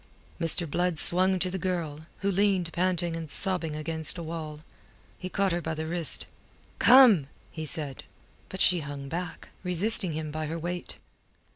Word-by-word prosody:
Mr. 165 0 +2
Blood 175 +2 -1
swung 185 +4 +4
to 185 0 0
the 190 - -4
girl, 160 -4 -4
who 200 0 0
leaned 190 -3 0
panting 175 -2 -1
and 165 -2 -7
sobbing 170 -3 -1
against 160 +2 0
a 170 - -6
wall. 155 -2 -7 0.6
He 185 - -6
caught 195 0 -1
her 175 +1 -2
by 160 -1 -4
the 160 0 -5
wrist. 165 0 +3 0.5
"Come!" 240 - +6 0.2
he 160 -1 -7
said. 145 -4 0 0.5
But 190 - -5
she 180 -1 +4
hung 140 -2 -8
back, 170 +1 -7
resisting 185 0 +4
him 155 0 -5
by 155 0 -5
her 165 +2 -5
weight. 175 +2 -5
170 Hz, 165 wpm, -26 LUFS, 155-185 Hz, 0.6 s, Come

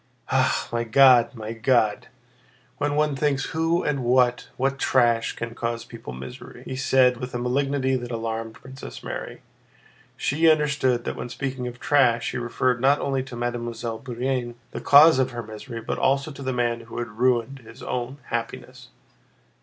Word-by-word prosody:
"Ah, - - +2
my 120 0 0
God! 125 +1 +5
my 110 0 -6
God! 115 -2 +1 0.7
When 145 0 0
one 150 -1 +1
thinks 140 -1 0
who 165 +2 +1
and 140 -3 -1
what—what 125 +2 +1
trash—can 115 -2 +1
cause 115 0 -3
people 115 - -9
misery!" 65 +1 -10
he 130 - -5
said 130 -2 +3
with 125 0 -6
a - - +1
malignity 130 +2 0
that 120 -1 -4
alarmed 115 -1 -4
Princess 130 +1 -10
Mary. - - -6 0.7
She 160 +4 +2
understood 140 -5 +2
that - - -4
when - - -6
speaking 130 -1 -4
of 125 0 -8
"trash" 125 -5 +2
he - - -4
referred 120 +1 0
not 140 +2 +4
only 135 -1 -1
to 130 -1 -8
Mademoiselle 120 -1 -4
Bourienne, 125 -1 -3 0.2
the - - -6
cause 145 0 +7
of 130 -1 +2
her 120 -2 -6
misery, 115 +2 -8
but - - -3
also 135 +3 +1
to 140 - -10
the 130 -1 -2
man 120 -2 0
who 115 0 -10
had 120 0 -2
ruined 125 +1 +1
his 110 -2 -14
own 125 +2 -3
happiness. 115 -1 -5
125 Hz, 165 wpm, -24 LUFS, 115-135 Hz, 0.7 s, cause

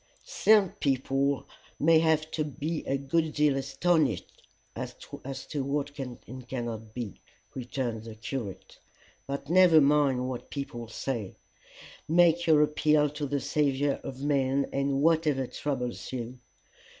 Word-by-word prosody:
"Some 215 - +4
people 135 0 0 0.3
may 160 +2 +5
have 160 -1 +2
to 155 - -1
be 150 +2 -4
a 135 - +1
good 155 +3 0
deal 150 -2 +3
astonished 140 - 0 0.3
as - - -5
to 135 +1 -6
what 145 +1 -2
can 130 -4 -6
and 130 0 -10
cannot 115 -4 -5
be," 120 -6 -6 0.3
returned 120 -3 -4
the 115 -1 -8
curate. 110 -2 -6 0.5
"But 140 0 -4
never 175 -1 +6
mind 140 -3 +3
what 130 -2 -6
people 120 -5 -5
say: 115 -3 -4 0.7
make 175 0 +4
your 155 -2 +6
appeal 150 -1 +2
to 150 -1 -4
the 140 +1 -1
saviour 140 -1 0
of 135 +1 -7
men 140 -1 +2
about 140 0 0
whatever 145 -1 +2
troubles 125 -2 -4
you. 125 0 -5
140 Hz, 135 wpm, -28 LUFS, 130-150 Hz, 0.7 s, never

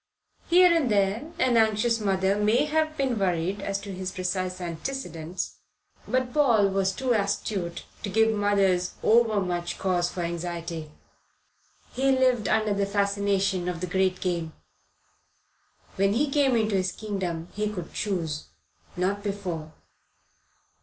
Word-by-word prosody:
Here 355 0 +6
and 300 -7 +2
there 205 +8 +1
an 245 -2 +3
anxious 225 +1 +3
mother 195 -1 +1
may 215 +7 +3
have 310 0 0
been 260 -5 0
worried 185 +1 0
as 195 0 -2
to 200 -1 -7
his 185 0 -4
precise 185 0 -2
antecedents; 175 -1 -5 0.5
but 255 -1 0
Paul 235 -9 +4
was 190 0 +1
too 255 +5 0
astute 200 -4 -2 0.2
to 205 - -4
give 220 +2 +3
mothers 195 -3 +1
over 225 -2 +4
much 175 -2 -2
cause 175 -2 +1
for 180 - -5
anxiety. 170 -2 -4 1.0
He 270 +1 +2
lived 255 -5 +2
under 215 -1 +2
the 200 0 0
fascination 200 -2 0
of 175 -2 -4
the 180 - -2
Great 185 0 +1
Game. 170 -3 -2 1.4
When 195 +1 +3
he 275 +5 +1
came 275 -3 +3
into 220 -2 +1
his 185 0 0
kingdom 180 -6 -4
he 210 +1 -1
could 180 -5 -7
choose; 165 -7 -2 0.5
not 195 +3 0
before. 185 -6 -4
200 Hz, 140 wpm, -26 LUFS, 180-225 Hz, 1.4 s, Here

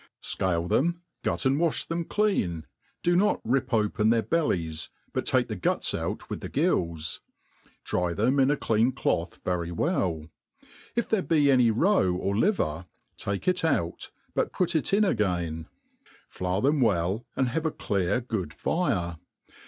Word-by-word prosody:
SCALE 85 -2 -1
them, 170 - +1 0.2
gut - - -1
and 135 +2 +3
wa(h 170 -2 0
them 170 +1 -2
clean; 100 - 0 0.4
do 175 0 +3
not 205 +4 +3
rip 130 +2 0
open 105 -1 +2
their 115 -1 +3
bellies, 85 - -1 0.2
but - - -2
take - - +2
the - - -4
guts - - 0
out - - -3
with - - -5
the - - -5
gills; 85 -2 0 0.6
dry 90 -1 0
them 120 +10 +1
iti 135 +2 +4
a - - -2
clean 115 +1 +2
cloth 90 -9 -1
very 85 -2 -1
well: 85 - 0 0.7
if 235 - 0
there 220 -3 +1
be 150 -5 +3
any 125 -3 +5
roe 115 - +3
or 100 +2 -1
liver, 95 - 0 0.3
take 100 - -4
it 180 -1 +2
out, 110 - 0 0.2
but - - 0
put 180 -3 0
it 155 - +1
in 205 +2 +4
again; 85 - -1 0.6
flour 90 +2 -2
them 140 +1 +2
well, 100 0 +1
and 130 -2 +1
have 160 +6 -1
a - - +2
clear 100 - 0
good 105 -10 -3
fire. 90 - -1
115 Hz, 160 wpm, -27 LUFS, -, 0.7 s, any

